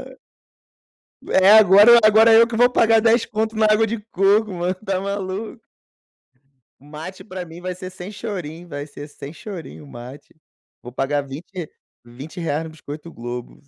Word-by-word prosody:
Hã. - - -12 1.1
É, 190 +2 +4
agora 215 +3 +8
agora 220 +1 +6
eu 230 +1 +6
que 230 - -6
vou 245 +2 +4
pagar 225 -2 +3
dez 230 +1 +3
conto 220 +1 -3
na 215 0 +2
água 215 +1 +3
de 225 0 -4
coco, 200 +2 +2
mano, 175 +1 -2
está 190 0 -3
maluco? 200 +3 -5 1.2
O - - -19
Mate 155 +5 -10
para 185 -4 -7
mim 165 +1 -12
vai 180 0 -5
ser 185 0 -8
sem 185 +1 -10
chorinho, 180 -6 -7
vai 145 -1 -7
ser 145 0 -10
sem 145 +1 -10
chorinho 175 -6 -9
o - - -15
Mate. 125 +3 -12 0.5
Vou 125 - -11
pagar 140 +2 -1
20 165 +4 -8 0.4
R$20 150 +5 -5
no 160 - -8
biscoito 155 +1 -10
Globo. 120 +1 -8
185 Hz, 165 wpm, -21 LUFS, 150-215 Hz, 1.2 s, agora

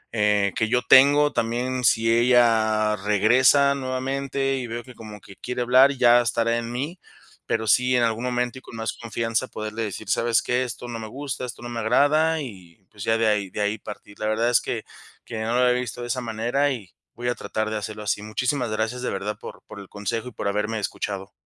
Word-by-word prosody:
eh, 105 -2 +2
que 110 -3 0
yo 125 0 +2
tengo, 145 +2 +6
también 120 +2 -1
si 115 0 +3
ella 115 -3 +3
regresa 120 +8 +4
nuevamente 135 +1 -2
y 125 -2 -4
veo 120 +1 -5
que 125 - -13
como 105 -2 -11 0.2
quiere 125 0 -3
hablar, 130 +3 +6
ya 120 -2 +5
estará 115 0 0
en 115 0 -6
mí, 145 +9 -4 0.5
pero 110 0 -1
sí, 125 +4 +3
en 120 - +3
algún 115 +1 0
momento 125 +1 -2
y - - -22
con - - -12
más 115 0 -3
confianza 115 +1 -2
poderle 110 +1 -6
decir: 105 0 -6
"¿Sabes 115 0 +2
qué?, 125 +1 0
esto 120 0 -6
no 115 -1 -5
me 110 - -6
gusta, 130 +1 -5
esto 120 0 -9
no 120 - -6
me 120 -1 -4
agrada", 155 +8 +3
y, 95 -6 -12
pues, 105 -2 -9
ya 115 0 +2
de 115 - +1
ahí 105 -3 +1
de - - -7
ahí 105 +1 -1
partir, 100 -1 -11
la 110 - -2
verdad 115 +2 +1
es 120 - +4
que - - -4 0.4
que 110 -1 -5
no 115 +2 -1
lo 125 - +3
había 125 0 +3
visto 120 0 -6
de 120 - -5
esa 125 +1 -2
manera, 120 +5 0
y 105 -9 -6 0.2
voy 120 +1 -5
a - - +1
tratar 110 0 -3
de 110 - -1
hacerlo 105 +1 -6
así, 105 0 -1
muchísimas 120 +4 -1
gracias 110 +3 -2
de 125 - -2
verdad 100 +2 -4
por - - -10
por 100 - -11
el 100 - -11
consejo 115 +4 -4
y - - -15
por 100 - -4
haberme 105 +2 -1
escuchado. 100 -1 -4
115 Hz, 220 wpm, -24 LUFS, 110-125 Hz, 0.5 s, tengo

